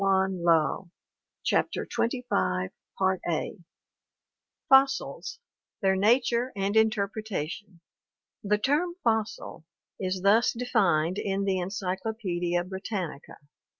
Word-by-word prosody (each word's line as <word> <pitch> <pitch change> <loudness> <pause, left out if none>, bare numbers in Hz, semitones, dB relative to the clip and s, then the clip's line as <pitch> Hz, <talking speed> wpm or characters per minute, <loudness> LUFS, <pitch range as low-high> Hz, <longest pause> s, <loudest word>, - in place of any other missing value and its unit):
Paleontology 185 -3 +2 0.5
CHAPTER - - 0
XXV 230 - -1 2.0
Fossils: 270 +9 +3 0.5
Their 190 0 +4
Nature 235 +4 +2
and 200 +1 -1
Interpretation 210 -4 -1 0.6
The 210 +1 +2
term 300 +10 0
fossil 220 -7 -1 0.4
is 185 -1 -2
thus 215 +4 +4
defined 195 -8 +1
in 195 0 -1
the 190 -1 +1
Encyclopaedia 185 -2 -2
Britannica: 190 -4 -5
"(L. - - -29
195 Hz, 85 wpm, -27 LUFS, 180-225 Hz, 2.0 s, Their